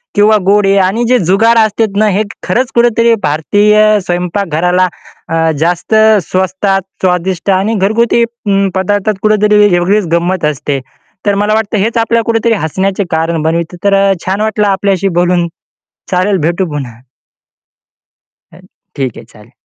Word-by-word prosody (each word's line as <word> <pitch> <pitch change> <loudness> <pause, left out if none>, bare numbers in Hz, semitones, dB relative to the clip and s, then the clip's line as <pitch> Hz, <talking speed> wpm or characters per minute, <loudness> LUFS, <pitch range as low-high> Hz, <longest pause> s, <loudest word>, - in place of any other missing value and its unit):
किंवा 210 +1 +4
गोडे 200 0 +3
आणि 210 +6 0
जे 250 +1 +3
जुगार 225 +5 +3
असतात 210 -1 -2
ना, 215 +1 +3
हे 205 +2 0 0.2
खरंच 240 +7 -1
कुठेतरी 235 -1 +3
भारतीय 210 +8 +2
स्वयंपाक 180 +3 -2
घराला 180 +4 +1 0.4
अ, 165 0 +1
जास्त 175 +5 -1 0.3
स्वस्तात, 190 +1 0 0.2
स्वादिष्ट 180 +1 -1
आणि 200 +4 -1
घरगुती 220 +4 +1
अं, 205 -4 -1
पदार्थात 205 +2 0
कुठेतरी 210 0 +3
वेगळीच 185 +3 +1
गंमत 175 0 0
असते. 145 -1 -2 0.5
तर 205 -1 +1
मला 205 +1 0
वाटतं 220 0 -1
हेच 225 +4 -1
आपल्याला 230 0 +1
कुठेतरी 230 0 +1
हसण्याचे 190 +5 -1
कारण 160 0 -1
बनतात 165 +2 -2
तर 200 0 +2
अ, 195 0 +3
छान 190 +3 -1
वाटलं 215 -1 0
आपल्याशी 195 -1 0
बोलून 175 -1 +1 0.6
चालेल 185 +2 +1
भेटू 175 +2 -1
पुन्हा. 135 -5 -6 1.6
अ, - - -16 0.4
ठीक 130 -4 -3
आहे - - -11
चालेल. 105 +2 -19
195 Hz, 145 wpm, -12 LUFS, 175-215 Hz, 1.6 s, किंवा